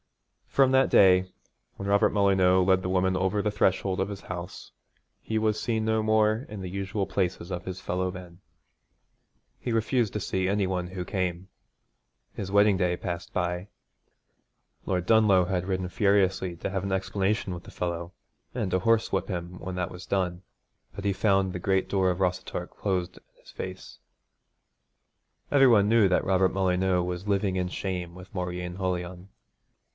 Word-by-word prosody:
From 135 -1 +3
that 130 0 +4
day, 95 -1 +5 0.5
when 100 - -5
Robert 100 0 +4
Molyneux 95 -2 +3
led 95 0 +3
the 90 - -3
woman 95 0 +1
over 95 +2 +1
the 105 - 0
threshold 95 -2 +1
of 95 - -1
his 100 -1 -7
house, 90 0 -7 0.5
he 110 - -2
was 110 -1 0
seen 110 -2 -1
no 110 0 +1
more 110 +2 +2
in 105 -2 -7
the 95 -1 -5
usual 100 +1 -2
places 95 -2 -2
of 90 0 -4
his 95 0 -5
fellow 90 +1 -2
men. 90 -2 -11 1.2
He 120 - -3
refused 115 0 +1
to 105 - -2
see 95 -1 -1
any 100 -1 +1
one 90 -1 -2
who 90 0 -5
came. 95 -2 -2 0.9
His 95 -1 -5
wedding 100 0 +5
day 90 -2 +1
passed 85 -1 -5
by. 90 +2 -2 1.2
Lord 90 -2 -1
Dunlough 105 -5 +5
had 90 0 -2
ridden 95 -1 -1
furiously 95 -2 +1
to - - -4
have 95 -1 -2
an 100 - -3
explanation 95 +1 -1
with 85 0 -8
the - - -12
fellow 85 -1 -4 0.4
and 110 -7 -2
to 95 - +2
horsewhip 115 +3 +1
him 90 -1 -5
when 95 -1 -6
that 90 0 -2
was 90 0 -10
done, 90 -2 -1 0.5
but 100 - -7
he 100 - +2
found 95 -2 +2
the 90 - -4
great 95 +1 +1
door 95 -2 +2
of 90 0 -1
Rossatorc 90 -1 -2
closed 90 -3 -2
in - - -17 0.2
his - - -16
face. - - -8 1.5
Every 135 -2 +6
one 105 -5 +5
knew 110 -2 +5
Robert 95 0 +2
Molyneux 95 -1 +1
was 90 +2 -4
living 100 -1 +1
in 90 -1 -1
shame 90 -2 -4
with 90 +2 -13
Mauryeen 90 -1 -4
Holion. 90 0 -3
95 Hz, 170 wpm, -27 LUFS, 90-100 Hz, 1.5 s, Every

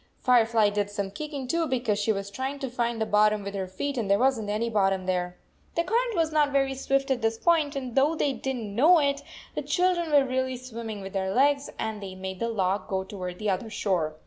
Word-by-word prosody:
Firefly 230 -4 +3
did 205 0 -1
some 200 -1 -3
kicking, 285 +2 -5
too, 330 +4 0
because 240 -6 0
she 210 +2 +1
was 200 -1 -3
trying 265 +5 -3
to 270 -3 -5
find 235 -2 -1
the 220 - +1
bot 210 0 +4
tom 210 -1 -2
with 200 0 -5
her 190 -2 -3
feet 260 +9 -3
and 210 -4 -2
there 200 - +5
wasn 250 -3 +1
t - - -1
any 220 +3 0
bottom 195 -4 +1
there. 180 -1 -1 0.4
The 335 - +2
current 465 +5 0
was 325 -1 +1
not 300 -2 +3
very 270 -1 +2
swift 270 +1 0
at 250 -2 0
this 225 0 0
point, 315 -1 +2
and 255 -3 -4
though 280 +5 +3
they 285 -3 +1
did 265 0 -3
n 245 - -5
t - - -5
know 295 - +5
it, 280 -2 +1 0.3
the - - -2
children 355 -3 +1
were 285 -2 +5
really 260 0 -1
swimming 230 -4 -7
with 195 0 -8
their 190 -1 -1
legs, 280 +5 +2
and 220 -1 -3
they 190 -1 -7
made 190 0 -6
the 230 - -1
log 195 -3 0
go 190 -1 -1
toward 185 -2 -6
the 210 0 0
other 195 +4 -3
shore. 175 -8 -1
230 Hz, 250 wpm, -27 LUFS, 200-275 Hz, 0.4 s, there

